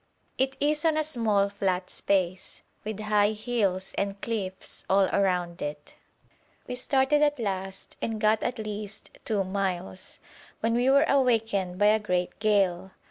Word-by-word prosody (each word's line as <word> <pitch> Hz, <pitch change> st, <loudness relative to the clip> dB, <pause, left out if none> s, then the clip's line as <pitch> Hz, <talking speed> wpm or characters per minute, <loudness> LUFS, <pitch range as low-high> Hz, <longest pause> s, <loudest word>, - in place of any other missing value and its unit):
It 265 Hz, +1 st, +1 dB
is 300 Hz, +1 st, +1 dB
on 320 Hz, -2 st, +3 dB
a 310 Hz, -, +2 dB
small 225 Hz, -9 st, +1 dB
flat 190 Hz, -2 st, -2 dB
space, 185 Hz, -2 st, -1 dB, 0.2 s
with 215 Hz, 0 st, -5 dB
high 210 Hz, 0 st, +3 dB
hills 210 Hz, -4 st, -1 dB
and 200 Hz, 0 st, -2 dB
cliffs 195 Hz, -5 st, -4 dB
all 195 Hz, 0 st, +5 dB
round 180 Hz, -3 st, 0 dB
it. 145 Hz, 0 st, -5 dB, 0.7 s
We -, -, -4 dB
started 265 Hz, +3 st, +2 dB
at 295 Hz, -1 st, +3 dB
last, 190 Hz, -4 st, -4 dB
and 225 Hz, -1 st, -2 dB
got 215 Hz, 0 st, +3 dB
at 245 Hz, -, -2 dB
least 210 Hz, -1 st, -5 dB
two 210 Hz, -3 st, +1 dB
miles, 185 Hz, -, -3 dB, 0.4 s
when 225 Hz, +1 st, +1 dB
we 245 Hz, +2 st, +3 dB
were 280 Hz, +3 st, +5 dB
awakened 225 Hz, -9 st, +1 dB
by 205 Hz, -, +3 dB
a 215 Hz, +1 st, +5 dB
great 180 Hz, -4 st, -2 dB
gale. 195 Hz, -3 st, +1 dB
210 Hz, 150 wpm, -27 LUFS, 190-235 Hz, 0.7 s, all